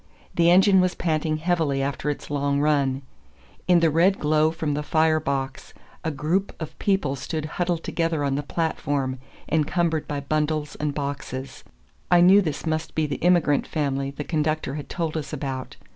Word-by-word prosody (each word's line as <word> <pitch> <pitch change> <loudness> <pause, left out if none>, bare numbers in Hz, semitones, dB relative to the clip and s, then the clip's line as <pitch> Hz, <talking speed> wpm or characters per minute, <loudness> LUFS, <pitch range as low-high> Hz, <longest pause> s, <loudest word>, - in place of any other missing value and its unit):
The 170 0 +4
engine 190 +1 +6
was 185 0 +1
panting 155 -2 0
heavily 155 -5 0
after 140 +1 -2
its 145 - -5
long 140 0 0
run. 140 -2 +1 0.6
In 175 -2 +5
the 165 -2 +4
red 180 +5 +3
glow 155 +1 +2
from 160 -2 -2
the 150 - -1
fire 155 +1 +2
box, 135 -1 -4 0.3
a 160 - 0
group 160 +7 -1
of 160 - -6
people 190 -9 +1
stood 150 +4 -4
huddled 170 +1 -2
together 165 -3 -1
on 140 -1 0
the 140 - 0
platform, 145 -4 -2 0.3
encumbered 160 +1 0
by 145 -1 -2
bundles 150 +1 -1
and 150 -1 -2
boxes. 140 -2 -5 0.5
I 175 - +6
knew 190 +4 +7
this 160 -4 -3
must 160 0 -2
be 155 - +1
the 145 - -3
immigrant 170 -5 +2
family 140 -3 -1
the 140 +2 -6
conductor 155 -3 -1
had 145 -1 -6
told 165 -3 -3
us 155 -1 -4
about. 135 -3 -5
155 Hz, 175 wpm, -24 LUFS, 140-165 Hz, 0.6 s, knew